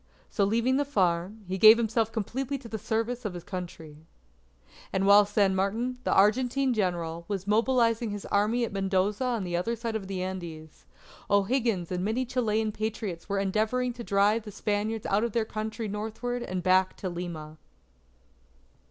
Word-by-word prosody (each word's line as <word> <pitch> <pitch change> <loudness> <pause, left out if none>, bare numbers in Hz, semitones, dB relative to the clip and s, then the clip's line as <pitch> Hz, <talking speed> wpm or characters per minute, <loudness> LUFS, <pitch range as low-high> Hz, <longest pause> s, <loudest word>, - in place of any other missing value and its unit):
So 200 - +2
leaving 235 +5 +2
the 285 - +2
farm, 190 -5 0
he 190 +1 -3
gave 220 +2 +9
himself 225 -1 0
completely 255 +5 -3
to 255 -3 -11
the 220 -1 -5
service 230 +3 -2
of 205 -5 -4
his 175 - -7
Country. 170 -5 -7 0.9
And 190 0 0
while 200 +1 +7
San 200 -2 +2
Martin, 225 +7 -1
the - - +1
Argentine 250 +6 +3
General, 170 -5 -2
was 195 -3 -3
mobilizing 230 +1 +2
his 205 -1 -5
Army 220 +4 +1
at 215 - -8
Mendoza 195 +3 0
on 240 -5 -1
the 175 -1 -3
other 205 +7 -1
side 230 0 -4
of 200 -3 -4
the 190 -2 -3
Andes, 170 -4 -7 0.4
O'Higgins 200 -3 +1
and 180 0 -1
many 225 +6 0
Chilean 220 -3 0
Patriots 210 -5 -4
were 200 - 0
endeavouring 220 +6 0
to 240 0 -8
drive 205 +2 +2
the 210 -1 -9
Spaniards 210 +2 -2
out 200 +3 +1
of 235 -3 -2
their 230 -2 +1
country 220 +1 -4
northward 220 +4 -4
and 185 -5 -4
back 185 +1 +3
to 190 - -4
Lima. 170 -3 -6
210 Hz, 170 wpm, -28 LUFS, 190-230 Hz, 0.9 s, gave